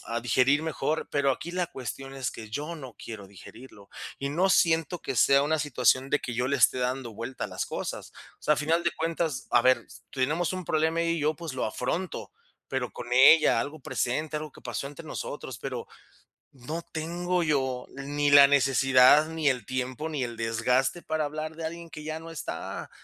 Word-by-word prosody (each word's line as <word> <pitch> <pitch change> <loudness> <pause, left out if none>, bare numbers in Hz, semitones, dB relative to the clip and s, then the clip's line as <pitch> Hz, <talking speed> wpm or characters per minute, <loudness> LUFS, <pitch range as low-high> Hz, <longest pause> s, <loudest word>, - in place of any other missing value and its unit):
a 115 +1 -2
digerir 135 +4 +3
mejor, 160 0 -2
pero 140 -1 +2
aquí 170 - -6
la 180 -1 0
cuestión 135 -1 -7
es 130 -1 -2
que 110 -1 -9
yo 150 +8 -4
no 130 -6 -10
quiero 110 -4 -8
digerirlo, 100 +1 -14 0.3
y 140 0 -3
no 180 +6 +2
siento 165 -2 +2
que - - -4
sea 140 0 +5
una 155 +2 +1
situación 130 -2 +2
de 150 - +3
que 120 - -5
yo 125 +2 0
le 140 - +1
esté 125 0 +4
dando 125 -1 -2
vuelta 115 +4 -5
a - - -2
las - - -3
cosas. - - -5 0.3
O - - -38
sea, 150 - +4
a - - -10
final 160 +3 +1
de 170 - +3
cuentas, 165 -3 -2
a 120 - +5
ver, 130 0 +3 0.2
tenemos 150 +8 0
un 185 -1 -5
problema 160 +2 +1
ella 165 - 0
y 165 - -2
yo, 155 +1 +1
pues 165 -5 -6
lo 130 - -1
afronto, 145 - -3 0.4
pero 130 -2 -2
con 120 0 -8
ella, 135 +5 +7
algo 145 +1 -5
presente, 150 +6 -2
algo 150 -1 -5
que - - -15
pasó 125 +2 -4
entre 150 +3 -10
nosotros, 130 -6 -6
pero 125 -3 -5 0.7
no 150 +6 -6
tengo 175 +3 -1
yo 130 -5 0
ni 145 +1 -1
la 140 -1 +10
necesidad, 135 +1 +5
ni 160 -2 -1
el 125 -5 -1
tiempo, 130 +4 -3
ni 145 -4 -2
el 120 -1 -7
desgaste, 120 +7 +1
para 155 -1 -1
hablar 155 +2 -5
de 165 -1 -5
alguien 170 +1 -6
que 155 -1 -9
ya 155 +1 -4
no 165 +1 -10
está, 165 - -6
145 Hz, 205 wpm, -27 LUFS, 130-160 Hz, 0.7 s, la